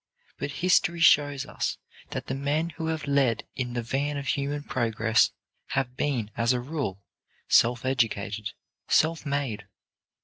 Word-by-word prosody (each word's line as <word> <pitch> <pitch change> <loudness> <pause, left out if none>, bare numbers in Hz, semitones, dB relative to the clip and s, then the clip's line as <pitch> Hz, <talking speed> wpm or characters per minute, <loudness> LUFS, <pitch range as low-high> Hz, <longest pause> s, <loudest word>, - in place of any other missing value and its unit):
But 140 - -2
history 175 -2 +3
shows 145 -4 +4
us - - -2 0.3
that - - -4
the - - -3
men 145 +5 0
who 160 0 -5
have 160 -1 -2
led 140 -5 +2
in 125 -2 -3
the 120 -1 -2
van 140 +5 -1
of 140 -3 -3
human 145 +1 -1
progress 115 -3 +2 0.5
have 125 -2 0
been, 125 -7 -1
as 115 +2 +2
a 125 - 0
rule, 125 - -4 0.4
self 120 +1 +4
educated, 110 -5 -1 0.3
self 160 0 +2
made. 130 -8 -2
135 Hz, 145 wpm, -27 LUFS, 115-145 Hz, 0.5 s, shows